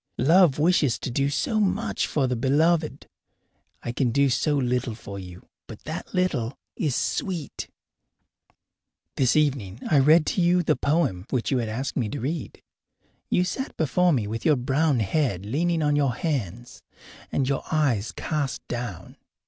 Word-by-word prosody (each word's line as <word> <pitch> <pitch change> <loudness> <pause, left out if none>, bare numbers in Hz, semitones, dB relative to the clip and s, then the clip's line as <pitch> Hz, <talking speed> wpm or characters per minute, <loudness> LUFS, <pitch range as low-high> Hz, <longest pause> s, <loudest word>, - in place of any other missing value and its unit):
Love 160 +3 +5
wishes 150 -5 +3
to - - -5
do 140 +3 +1
so 180 - 0
much 215 +2 0
for 145 -3 0
the 125 -1 0
beloved! 155 +6 +1 0.8
I 120 - -3
can 125 +1 0
do 140 +3 +2
so 145 +4 +1
little 125 -3 -1
for 100 -3 -8
you, 90 -1 -11 0.2
but - - -11
that - - -6
little 140 -10 -1 0.2
is 145 -6 -1
sweet. 170 -8 -3 1.5
This 130 -2 +2
evening 130 -10 0
I 145 - +6
read 155 +4 +5
to 185 - 0
you 175 +1 +3
the - - +2
poem 140 - 0
which 125 0 -1
you 130 - +2
had 115 -2 -2
asked 130 +5 -4
me 115 -5 0
to 145 - -4
read. 145 +5 -4 0.7
You 180 - +3
sat 265 +9 -4
before 175 +4 +2
me 120 -9 +1
with 110 +2 -4
your 155 - +4
brown 135 +1 +1
head 105 - 0
leaning 160 +8 0
on 150 0 +2
your 140 -4 +1
hands 120 - -4 0.5
and 135 - 0
your 140 0 0
eyes 130 -9 +1
cast 145 -5 -3
down. 120 -7 -6
140 Hz, 165 wpm, -25 LUFS, 120-160 Hz, 1.5 s, I